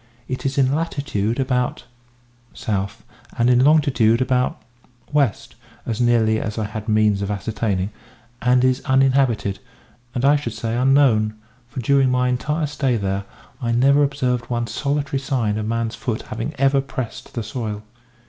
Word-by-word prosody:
It 130 +1 -3
is 135 - -3
in 135 -1 +3
latitude 140 -8 -1
about 125 -2 0 0.7
South, 100 -2 -3 0.3
and 120 +1 +3
in 125 +1 +4
longitude 135 -7 +4
about 125 -1 0 0.5
West, 140 -9 +1 0.3
as 115 0 -2
nearly 115 -2 +3
as 110 0 -4
I 110 - -1
had 105 0 -6
the - - 0
means 105 -2 +3
of 100 - -2
ascertaining; 105 -1 -2 0.5
and 125 +1 +3
is 130 +1 +2
uninhabited, 130 -7 +2 0.6
and, 125 +1 0
I 145 +1 +5
should 120 -6 -5
say, 115 0 -3
unknown; 125 -5 +3 0.3
for 130 +1 -6
during 135 +2 +3
my 125 0 +2
entire 150 +5 -1
stay 135 -4 0
there, 100 -1 -2 0.4
I 115 -2 0
never 140 +4 +4
observed 130 -4 0
one 120 -1 -1
solitary 140 +2 -2
sign 120 -6 -1
of 110 - -3
man's 115 0 -1
foot 115 -3 -3
having 115 +7 -5
ever 135 0 +3
pressed 130 -3 -6
the 115 - -2
soil. 110 -2 -5
125 Hz, 160 wpm, -21 LUFS, 110-135 Hz, 0.7 s, I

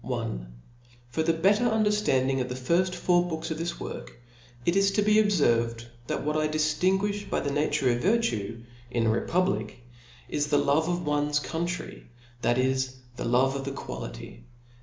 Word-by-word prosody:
2^ 120 - -9 1.0
25^0 - - -14
R - - +4
the 165 - +3
better 200 +8 +3
under/landing 210 - +2
oftbejirjl 130 +9 0
four 175 0 +2
books 160 0 -4
of 160 - -3
this 170 +1 -3
work, - - -7 0.5
it 170 - +2
is 195 0 +4
to 205 +1 +1
b^ 210 +1 +4
abr' - - +1
ferved 115 - +1 0.2
that - - -2
what 150 0 0
I 155 0 +2
dijlinguijh 190 +7 0
by - - 0
th( 140 0 -2
name 145 +1 +1
ofvit^ 150 - +2
Cue, 115 - -3 0.3
in 120 -2 0
a 110 - +3
republic, 115 - -1 0.4
is 150 0 -1
the 145 -1 +3
love 145 +3 +2
of 175 -1 -1
ones 145 0 +1
country 170 +3 -4
y - - -23 0.3
that 120 - +2
is, 130 0 0 0.2
the - - -4
love 130 +3 +3
of 135 0 -4
equality. - - -7
150 Hz, 175 wpm, -27 LUFS, 130-180 Hz, 1.0 s, R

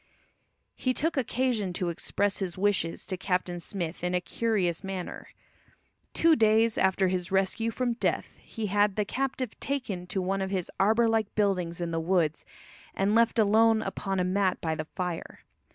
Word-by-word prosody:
He 255 -1 -1
took 325 +3 0
occasion 245 -6 0
to 180 -1 -1
express 200 +4 -1
his 185 -3 -3
wishes 190 -4 0
to 185 - -4
Captain 180 -2 -1
Smith 170 -1 -5
in 180 0 0
a - - +3
curious 185 -3 -1
manner. 190 -2 -5 0.9
Two 330 -1 +5
days 220 -1 +4
after 190 0 +2
his 185 0 -2
rescue 195 +4 +1
from 240 +1 -1
death 235 - -2
he 225 -2 -5
had 205 0 +2
the 210 - 0
captive 260 -1 -3
taken 220 -11 -3
to 190 - -2
one 195 +1 -1
of 190 - -2
his 190 -3 -2
arbour 220 +4 +4
like 220 -2 0
buildings 180 -5 0
in 170 -1 -2
the 165 - -1
woods 165 -2 0 0.5
and 195 +2 +1
left 230 +1 +3
alone 220 +1 +4
upon 195 -1 -3
a - - +2
mat 185 0 +1
by 160 -1 -1
the 155 0 -4
fire. 180 +1 -5
195 Hz, 170 wpm, -28 LUFS, 180-225 Hz, 0.9 s, Two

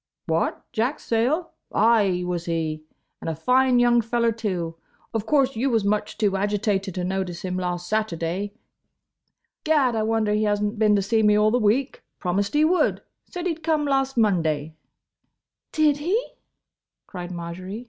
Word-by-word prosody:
"What, - - -1
Jack 245 +6 -1
Sayle? 255 +10 0 0.2
Ay, 205 -5 +3
was 175 -1 -3
he. 160 -2 -2 0.4
And - - -3
a 160 - -2
fine 250 - +3
young 240 -1 +4
feller, 235 +1 +1
too. 185 -7 -3 0.4
Of 225 -1 -2
course 270 -2 +2
you 255 +5 0
was 225 -4 +1
much 210 +1 -1
too 205 -3 +1
agitated 200 -1 -1
to 180 - -2
notice 180 -2 -3
him 185 -1 -3
last 180 -1 -3
Saturday. 200 -1 -2 1.1
Gad! 285 -6 +2
I 220 - 0
wonder 220 -1 +1
he 215 +1 +1
has 205 -1 +1
n't 210 +1 -2
been 210 -1 +4
to 200 - +1
see 220 +3 +2
me 210 -1 +4
all 210 0 +4
the 245 - +2
week. 240 +6 +1 0.2
Promised 200 +6 -1
he 300 +1 +5
would. 355 +3 +1 0.2
Said 355 0 -6
he 355 - +1
'd 325 - -13
come 310 -2 +1
last 270 -2 0
Monday." 160 -8 +1 1.0
"Did 305 -2 +3
he?" 350 +10 +1 0.9
cried 180 -2 -7
Marjory. 180 +4 -6
210 Hz, 170 wpm, -24 LUFS, 185-245 Hz, 1.1 s, he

